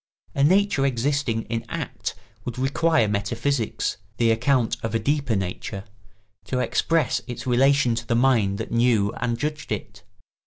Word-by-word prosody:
A 140 - +1
nature 190 -2 +3
existing 135 -2 0
in 115 0 -3
act - - -4 0.3
would 120 +1 -5
require 140 0 +2
metaphysics—the 110 0 -1
account 120 +1 +2
of 115 0 -3
a - - +2
deeper 140 0 0
nature—to 100 +4 -6
express 135 -2 +1
its 120 - -6
relation 130 0 +3
to 115 0 -4
the 115 - +1
mind 115 -6 +3
that - - -5
knew 115 -3 +2
and 120 -1 -1
judged 150 +2 -4
it. 100 -2 -5
120 Hz, 140 wpm, -24 LUFS, 105-140 Hz, 0.3 s, nature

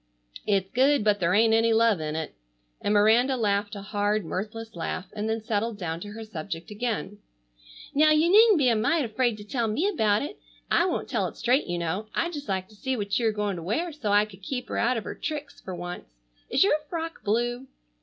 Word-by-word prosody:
It's 195 -2 +1
good, 270 0 +3
but 205 -1 +3
there 180 +1 +2
ain't 225 +1 +4
any 225 0 +4
love 225 -4 +4
in 155 0 -3
it." 160 -1 -4 0.5
And - - 0
Miranda 225 +6 +4
laughed 205 -1 0
a 200 - -7
hard 205 0 0
mirthless 215 +6 -5
laugh, 175 +2 -3
and 215 +1 -3
then 220 0 -2
settled 220 0 -1
down 165 -4 -4
to 205 +3 -8
her 225 +1 -7
subject 170 -3 -6
again. 210 -2 -3 0.7
"Now, 305 +2 +5
you 310 +3 +4
needn't 430 -1 +7
be 275 -4 +3
a 230 - +3
mite 285 +7 +2
afraid 235 0 0
to 210 - -9
tell 230 +2 -1
me 245 - 0
about 220 - +2
it. 340 +8 -7 0.3
I 340 - +4
won't 355 - -2
tell - - 0
it - - -10
straight, 255 +4 +2
you 175 -1 -2
know. 175 +6 -2
I'd 345 +1 0
just 290 -2 -7
like 190 -1 -1
to 215 - -17
see 260 +4 -2
what 200 0 -1
you 230 - +1
are - - +3
going 210 -3 -2
to - - -6
wear 275 - -1
so 250 -9 -3
I 205 +1 +5
could 200 -2 -15
keep 250 +5 -5
her - - -3
out 245 +1 +2
of 220 - -3
her - - -5
tricks 300 -2 -6
for 185 - -6
once. 175 - -7 0.4
Is - - +4
your 295 +10 +3
frock 330 -1 -5
blue?" 240 +4 -1
220 Hz, 230 wpm, -26 LUFS, 200-255 Hz, 0.7 s, needn't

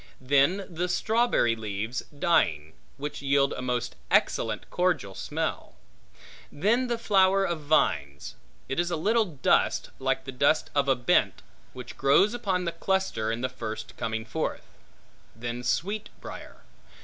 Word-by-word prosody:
Then 140 +9 +2
the 180 +1 -3
strawberry 220 - +2
leaves 110 +2 -4
dying, 140 - +1 0.2
which 145 +1 -5
yield 140 0 +2
a - - -5
most 125 -1 -2
excellent - - +1
cordial 170 - 0
smell. - - -4 0.8
Then 220 - +1
the 240 -1 -1
flower 195 -3 +3
of 170 -3 -2
vines; 75 - 0 0.3
it 135 - -2
is 175 0 +1
a 170 - -1
little 220 +8 +2
dust, 150 -8 +1
like 135 0 -1
the 135 - -5
dust 140 +4 +2
of 140 -1 +1
a 135 - +4
bent, 120 0 +1 0.3
which 125 -1 -9
grows 140 - +4
upon 195 -7 -1
the 170 - 0
cluster 190 - -1
in 115 +1 -3
the 130 - +1
first 115 -2 -7
coming 110 -1 -3
forth. - - -3 0.7
Then 120 +2 -5
sweet 190 - -1
briar. - - -10
140 Hz, 145 wpm, -27 LUFS, 120-185 Hz, 0.8 s, a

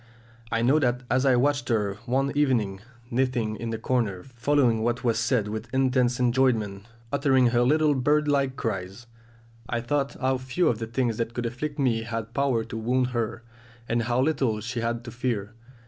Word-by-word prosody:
I 115 0 +1
know 135 +6 +4
that 125 -2 0
as 130 +1 +3
I 130 - +5
watched 140 0 +1
her 105 -3 0
one 135 +3 +1
evening 120 -10 +1 0.3
knitting 120 -3 0
in 115 - -4
the 115 - -2
corner, 110 -6 -1
following 125 -2 +1
what 120 +3 -1
was 115 -2 +1
said 120 -3 +1
with 110 +2 -5
intense 130 -2 +2
enjoyment, 120 -5 +1 0.3
uttering 130 -3 +4
her 120 0 +2
little 150 +4 +3
bird 150 +3 +2
like 140 -2 +1
cries, 100 -1 -4 0.6
I 120 - 0
thought 140 +3 -1
how 130 -1 +1
few 130 +8 +1
of 115 - -1
the 115 - -4
things 115 -1 -1
that 115 0 -3
could 120 - -2
afflict 145 +6 -4
me 125 -5 +1
had 115 0 -5
power 135 -5 +1
to 115 0 -7
wound 125 +3 +1
her, 120 -1 -2 0.4
and 120 0 +1
how 120 +2 0
little 130 -6 +1
she 115 +3 -4
had 115 +1 -2
to 120 - -8
fear. 115 -4 -3
120 Hz, 185 wpm, -26 LUFS, 115-130 Hz, 0.6 s, I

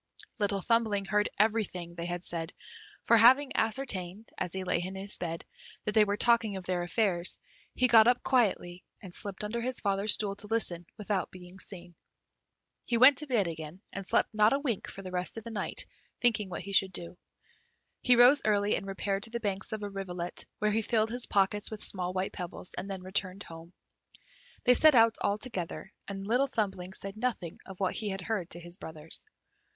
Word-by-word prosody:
Little 200 -1 +1
Thumbling 220 -2 +1
heard 210 +2 +1
everything 205 -5 0
they 170 0 -5
had 175 0 -4
said, 165 0 -4 0.5
for 230 - +5
having 260 +5 +6
ascertained, 220 -4 -1
as 180 -2 -3
he 190 +1 -3
lay 175 -2 0
in 185 +2 -5
his 195 +1 -2
bed, 165 -1 -4 0.4
that 210 - 0
they 215 -1 +6
were 205 0 -1
talking 230 -3 +3
of 190 -2 -6
their 180 -1 -1
affairs, 175 -1 +1 0.4
he 255 - +3
got 225 -1 +7
up 245 0 +3
quietly, 190 -8 +1 0.2
and 185 -3 -10
slipped 200 +1 -5
under 225 +3 -3
his 255 +1 -2
father's 200 +1 +4
stool 200 -2 -1
to 210 - -9
listen, 180 -6 0
without 205 -2 -2
being 180 +1 -10
seen. 175 -3 -7 0.9
He 235 - 0
went 255 +3 +7
to 300 - -6
bed 225 -8 +1
again, 160 +1 -7
and 195 -1 -5
slept - - +1
not 215 +2 +4
a - - +3
wink 260 -8 -3
the 190 -2 -8
rest 180 +4 -3
of 225 - -6
the 230 - -8
night, 210 - -2 0.3
thinking 215 -5 +1
what 180 - -5
he 200 +2 -7
should 190 -1 +4
do. 170 +1 -5 0.9
He 250 - +5
rose 250 +4 +7
early 205 -1 +2
and 195 - -5
repaired 195 0 -2
to 225 - -5
the 235 +1 -4
banks 195 -3 -3
of 215 -1 -4
a 205 - -3
rivulet, 180 -3 -5
where 210 0 +1
he 220 +2 +1
filled 220 0 +1
his 245 0 0
pockets 200 +1 +2
with 215 -1 -7
small 180 -2 0
white 185 +1 -2
pebbles, 180 -1 -6
and 195 +2 -5
then 190 -2 -6
returned 185 0 -2
home. 165 +1 -11 0.9
They 250 - +6
set 310 +2 +6
out 230 -1 +5
all 200 - +1
together, 195 -4 -6
and 195 0 -6
Little 250 +6 +2
Thumbling 195 -7 -3
said 195 +2 -8
nothing 220 -8 -3
of 190 -2 -10
what 190 -2 0
he 215 - -3
had 195 -1 -4
heard 185 -3 -3
to 170 - -4
his 175 +1 -7
brothers. 160 -2 -3
200 Hz, 200 wpm, -30 LUFS, 180-225 Hz, 0.9 s, got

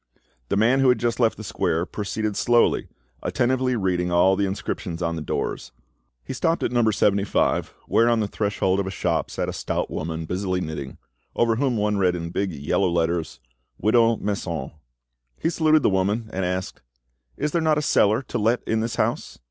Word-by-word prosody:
The - - +1
man 120 +6 +4
who 135 -1 +4
had 125 - +4
just 120 0 -1
left 115 -2 +2
the 110 - -8
square 85 -4 -1
proceeded 105 +1 -3
slowly, 120 +2 +2 0.3
attentively 130 +1 +1
reading 90 -4 0
all 90 +2 +4
the 100 0 0
inscriptions 90 -2 -4
on 85 0 -1
the 80 - -4
doors. 75 - -3 0.5
He - - -6
stopped 165 +1 0
at - - 0
Number 120 -3 +3
75, 100 -1 +1
where 115 +1 +3
on 115 -1 +2
the 105 - 0
threshold 100 -2 0
of 100 - -1
a - - -2
shop 85 -4 -1
sat - - -3
a - - -3
stout - - -3
woman 80 +1 -4
busily 90 +2 -2
knitting, 80 -6 -5 0.4
over 115 -1 +2
whom 130 -3 +1
one 105 0 +1
read 90 -2 +2
in 85 -1 -5
big 95 +1 -1
yellow 80 +5 0
letters, 85 -1 -1 0.4
"Widow 115 +2 +3
Masson." 90 -9 -3 0.7
He 165 - 0
saluted 155 -3 +3
the - - +4
woman, 105 +4 0
and 95 0 -1
asked— 90 +1 -3 0.6
"Is 150 - -1
there 170 - +1
not 155 -1 +2
a 150 - 0
cellar 110 -3 +3
to 120 - -4
let 115 +3 +1
in 110 - 0
this 115 +1 -2
house?" - - -1
100 Hz, 190 wpm, -24 LUFS, 90-120 Hz, 0.7 s, man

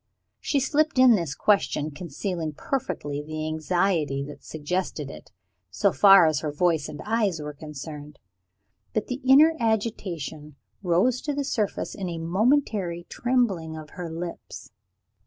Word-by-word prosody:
She 285 - 0
slipped 300 +2 +1
in 255 -1 +7
this 170 -9 -1
question, 175 -7 +1
concealing 165 +1 -4
perfectly 145 - -3
the 155 +1 -5
anxiety 155 -3 0
that 145 - -11
suggested 155 -2 -3
it, - - -12 0.4
so 110 - +2
far 195 -3 +7
as 155 -2 +2
her 150 -1 -3
voice 160 0 +1
and 145 - -8
her - - -12
eyes 210 -6 +1
were 150 0 -6
concerned. 150 0 -9 0.8
But 215 - 0
the 255 +2 -5
inner 285 +5 +7
agitation 180 - -2 0.3
rose 195 +8 +2
to 295 -2 -3
the 285 - -1
surface 215 -7 -2
in 190 -3 -4
a 170 - -4
momentary 185 - 0
trembling 200 -11 0
of 155 -1 -10
her 175 -2 -6
lips. 170 +1 -7
175 Hz, 145 wpm, -25 LUFS, 155-215 Hz, 0.8 s, in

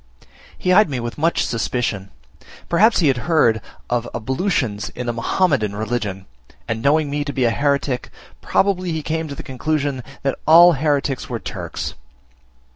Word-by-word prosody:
He 185 - +1
eyed 210 -2 +5
me 135 -3 -2
with 120 +3 -5
much 165 +3 +2
suspicion; 115 -4 -2 0.6
perhaps 210 +5 +4
he 160 - +3
had 135 -2 +3
heard 115 -9 +3 0.3
of 120 0 -1
ablutions 125 - -1
in 125 - -4
the 120 - -1
Mahomedan 115 - +1
religion, 105 -3 -3 0.4
and 115 0 -2
knowing 150 +3 +3
me 145 +1 -2
to 145 - -4
be 135 -2 -1
a 115 - +3
heretick, 140 -1 0 0.3
probably 185 -3 +1
he 160 -1 -3
came 160 +1 -2
to 140 - -6
the - - -7
conclusion 140 0 -2 0.2
that 135 -1 -1
all 170 +3 +9
hereticks 140 -2 -1
were - - -2
Turks. - - -5
140 Hz, 160 wpm, -20 LUFS, 120-160 Hz, 0.6 s, all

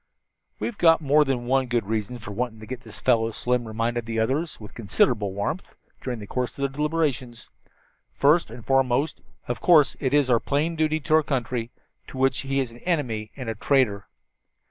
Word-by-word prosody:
"We've 235 - -4
got 165 -1 +6
more 150 +1 +4
than 130 -4 -2
one 130 +1 +2
good 120 -3 0
reason 110 +3 -2
for 105 -3 -8
wanting 115 +1 -3
to - - -8
get 125 +2 -6
this 110 -4 -12
fellow," 115 -3 +2
Slim 120 +1 -1
reminded 115 +1 -2
the 115 -1 -3
others 135 +9 -1
with 105 -2 -11
considerable 105 -1 +1
warmth, 100 - -4 0.3
during 125 -2 -3
the 105 - -8
course 125 +4 -2
of 140 - -3
their 140 - +1
deliberations. 145 -4 -2 0.6
"First 155 +5 +3
and 115 0 -10
foremost, 135 +2 +1 0.3
of 120 - -3
course, 155 -6 +5
is 140 0 +2
our 120 -2 +4
plain 150 +7 -1
duty 155 0 +1
to 155 +3 -1
our 160 - +7
country, 125 -5 -2 0.4
to - - -9
which 135 0 +2
he 135 0 -1
is 130 -3 -1
an 120 - -13
enemy 125 -11 -1
and 130 -3 -6
a 115 - -1
traitor. 110 -4 +1
125 Hz, 190 wpm, -25 LUFS, 115-145 Hz, 0.6 s, our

